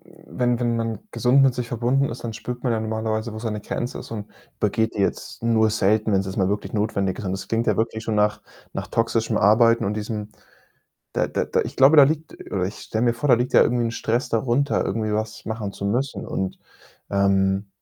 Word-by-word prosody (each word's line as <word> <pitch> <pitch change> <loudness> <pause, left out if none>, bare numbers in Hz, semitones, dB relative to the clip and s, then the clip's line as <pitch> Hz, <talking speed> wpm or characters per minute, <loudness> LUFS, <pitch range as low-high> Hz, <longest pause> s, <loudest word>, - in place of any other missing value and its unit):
m - - -20 0.2
wenn 120 -1 +2
wenn 120 -1 +1
man 115 -1 -2
gesund 125 +3 +3
mit 135 -2 +4
sich 125 -1 -4
verbunden 125 +4 +1
ist, 120 +1 -7
dann 115 - -3
spürt 120 +2 -6
man 125 - +2
ja 110 - 0
normalerweise, 110 0 -2
wo 110 - -6
seine 110 -2 -3
Grenze 120 +3 -4
ist - - -9
und 105 -2 -5 0.3
übergeht 110 +2 0
die 105 - -2
jetzt 100 - -2
nur 110 -1 +3
selten, 110 +1 +2
wenn's 95 0 +2
jetzt 95 - -5
mal 95 -1 +2
wirklich 105 +1 -3
notwendig 100 -3 -1
ist - - -6
und 95 - -2
das 95 - -5
klingt 115 +1 0
ja - - +2
wirklich 110 0 -1
schon 110 - -1
nach 105 0 +2 0.3
nach 95 - -4
toxischem 115 0 0
Arbeiten 115 +3 +4
und 100 - -1
diesem 105 0 -4 0.8
da - - +1
da - - -1
da - - +1
ich - - -5
glaube, 140 +4 +6
da 145 - +11
liegt 155 +3 -1 0.2
oder 95 -2 0
ich 100 - -5
stelle 110 +2 -2
mir 120 - +3
vor, 140 +5 -2
da 125 - +8
liegt 125 +2 -2
ja - - +7
irgendwie 120 0 +2
'n 115 - -1
Stress 115 +2 -1
darunter, 125 +5 +1
irgendwie 110 +1 -1
was 110 +1 -3
machen 110 -2 -4
zu 100 - -5
müssen 125 +7 -1
und, 95 -1 -3 0.5
ähm, 100 0 +2
110 Hz, 230 wpm, -23 LUFS, 105-120 Hz, 0.8 s, da